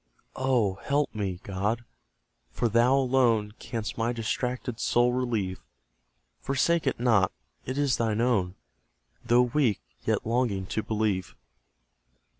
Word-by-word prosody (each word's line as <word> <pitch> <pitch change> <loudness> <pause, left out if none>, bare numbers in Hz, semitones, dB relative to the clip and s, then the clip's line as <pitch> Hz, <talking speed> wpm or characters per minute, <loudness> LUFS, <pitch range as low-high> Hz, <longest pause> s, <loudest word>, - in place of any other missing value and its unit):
Oh, 120 -8 +1
help 145 +1 0
me, 95 -4 -3
God! 105 +5 -2 0.6
For 120 - -1
thou 120 +4 +4
alone 125 -5 +2
Canst 115 -1 -5
my 115 +1 +1
distracted 125 +1 -3
soul 120 +1 +2
relieve; 115 -7 -1 0.8
Forsake 160 +5 +1
it - - 0
not: 110 -6 +3 0.4
it 130 - -3
is 140 -5 +2
thine 110 -2 0
own, 105 -7 +1 0.7
Though 120 +1 +4
weak, 125 -4 +1 0.2
yet - - 0
longing 115 -5 0
to 110 - -2
believe. 105 -4 -1
115 Hz, 120 wpm, -27 LUFS, 105-125 Hz, 0.8 s, thou